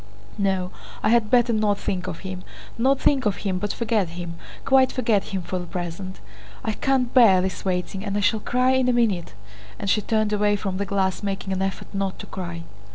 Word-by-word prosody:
No, 190 -2 0 0.3
I 210 - +3
had 230 -2 +3
better 240 0 +4
not 210 -2 +2
think 185 -2 -3
of 170 -3 -5
him; 185 -1 -6 0.3
not 265 +3 +2
think 265 -5 +3
of 200 - 0
him 185 -2 0
but 205 +1 -1
forget 220 -6 0
him, 170 0 -6 0.3
quite 265 -1 +5
forget 225 -6 +1
him 190 -2 -4
for 185 +2 -3
the 175 - -6
present. 180 +2 -5 0.4
I 220 - 0
can't 255 +2 0
bear 225 -8 +7
this 185 0 -2
waiting 185 +1 -2
and 205 -1 -2
I - - +1
shall 220 +2 +2
cry 250 +4 +2
in 260 -1 +3
a - - +3
minute!" 210 - +1 0.4
and 200 - -1
she 210 - +2
turned 215 0 0
away 205 0 +3
from 195 -2 -3
the 200 0 -2
glass, 190 -2 0
making 195 -1 -3
an 190 - -1
effort 195 0 -3
not 195 -1 -2
to - - -8
cry. 170 -3 -6
200 Hz, 215 wpm, -24 LUFS, 185-225 Hz, 0.4 s, bear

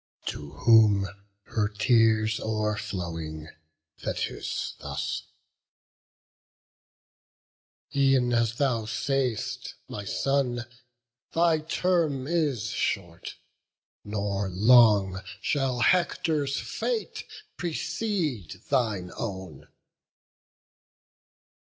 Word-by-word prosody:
To 75 -1 -5
whom, 110 -4 +5 0.4
her 105 0 0
tears 110 0 +3
o'erflowing, 85 -8 -3 0.5
Thetis - - -3
thus: - - -4 2.7
"E'en 135 -3 +3
as 115 -1 +2
thou 120 -5 +1
sayst, 130 -1 -2
my 105 - -6
son, 125 +2 0 0.7
thy 165 -1 +3
term 160 -4 0
is 145 - 0
short; 85 -4 -3 0.7
Nor 100 -1 -2
long 100 -2 +5 0.2
shall 130 +1 0
Hector's 155 -4 +2
fate 470 -3 -3 0.3
precede 160 - -2
thine 110 -9 +1
own." 95 -9 -6
115 Hz, 70 wpm, -27 LUFS, 100-140 Hz, 2.7 s, whom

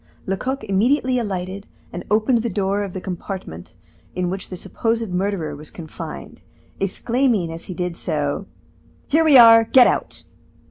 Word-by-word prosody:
Lecoq 255 +7 -3
immediately 250 +6 +1
alighted, 195 -2 -4 0.3
and - - -5
opened 220 +3 +2
the 235 - -2
door 200 0 -1
of 200 -3 -5
the 185 - -4
compartment 180 - -7 0.4
in 180 -1 -1
which 190 0 -5
the 185 - -6
supposed 225 +2 -2
murderer 180 -5 -2
was 150 +1 -10
confined, 110 - -9 0.4
exclaiming 210 -2 0
as 165 - -9
he 185 - -7
did 180 0 -3
so: 155 +3 -2 0.6
"Here 315 +3 +2
we 300 -4 +7
are, 230 -1 +9
get 250 +3 +6
out." - - -1
195 Hz, 150 wpm, -21 LUFS, 180-230 Hz, 0.6 s, are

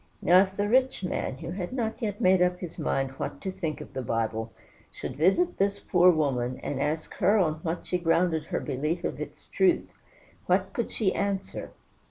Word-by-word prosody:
Now, 180 +2 +6
if 190 0 -2
the 205 0 +1
rich 255 -1 +2
man, 175 -6 -2
who 165 - -6
had 180 -1 -4
not 235 -2 -2
yet 210 -3 -2
made 185 0 +4
up 180 0 +3
his 175 -3 -7
mind 135 -1 0
what 140 - -4
to 190 - -3
think 170 -5 -4
of - - -10
the 130 - -3
Bible, 115 -1 -2 0.4
should 130 - -6
visit 195 - +2
this 200 +1 +2
poor 180 -1 +4
woman, 130 -7 +1
and 135 -1 -2
ask 155 +2 -2
her 200 +2 +4
on 155 -5 +1
what 170 -1 -3
she 180 - -1
grounded 165 -2 +2
her - - -2
belief 150 +6 -2
of - - -3
its - - -8
truth, 365 -3 +1 0.5
what - - +2
could - - -2
she 200 -4 0
answer? 195 -1 -2
180 Hz, 200 wpm, -27 LUFS, 150-195 Hz, 0.5 s, Now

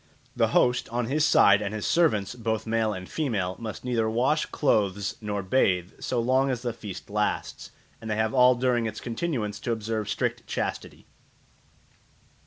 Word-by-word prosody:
The - - +3
host, 125 0 +2
on 120 0 -1
his 145 +6 0
side, 100 -8 +6
and 105 +1 -3
his 105 - -4
servants, 110 - +2
both 110 -2 -2
male 110 -1 +1
and 95 -2 -6
female, 105 - -2
must 115 +1 -7
neither 115 -3 0
wash 130 +7 +1
clothes 100 -7 0
nor 105 -2 -3
bathe 95 -3 +1
so 125 - -2
long 130 +3 +2
as 125 -2 -2
the 120 -2 -2
feast 105 -5 -8
lasts, 105 0 -2 0.3
and 110 - -7
they 105 - 0
have 110 +2 0
all 125 -1 +6
during 120 -2 +1
its 110 0 -5
continuance 115 -5 -3
to 120 - -3
observe 110 -1 -2
strict - - -2
chastity. - - -4
110 Hz, 170 wpm, -26 LUFS, 105-125 Hz, 0.3 s, side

